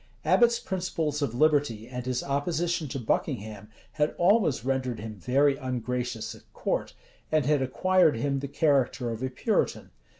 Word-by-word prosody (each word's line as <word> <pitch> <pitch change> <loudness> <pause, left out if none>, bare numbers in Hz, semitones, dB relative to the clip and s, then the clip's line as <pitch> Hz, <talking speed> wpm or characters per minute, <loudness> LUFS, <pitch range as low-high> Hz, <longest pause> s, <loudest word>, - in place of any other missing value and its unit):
[] - - -32
Abbot's 235 -1 +4
principles 165 -5 -2
of 120 -5 -1
liberty, 140 -6 +2
and 125 0 -6
his 125 -1 -1
opposition 165 +3 -1
to 135 - -4
Buckingham, 105 -3 -2 0.2
had 150 0 0
always 175 - +3
rendered 130 -3 -1
him 110 +1 -6
very 135 - +2
ungracious 125 -2 -3
at - - -18
court, - - -2 0.4
and 155 -3 +2
had 145 -1 +2
acquired 180 +4 +3
him 140 +3 0
the 140 - -4
character 135 -5 +1
of 115 +1 -5
a 130 - -1
Puritan. 130 - -1
135 Hz, 160 wpm, -27 LUFS, 125-155 Hz, 0.4 s, Abbot's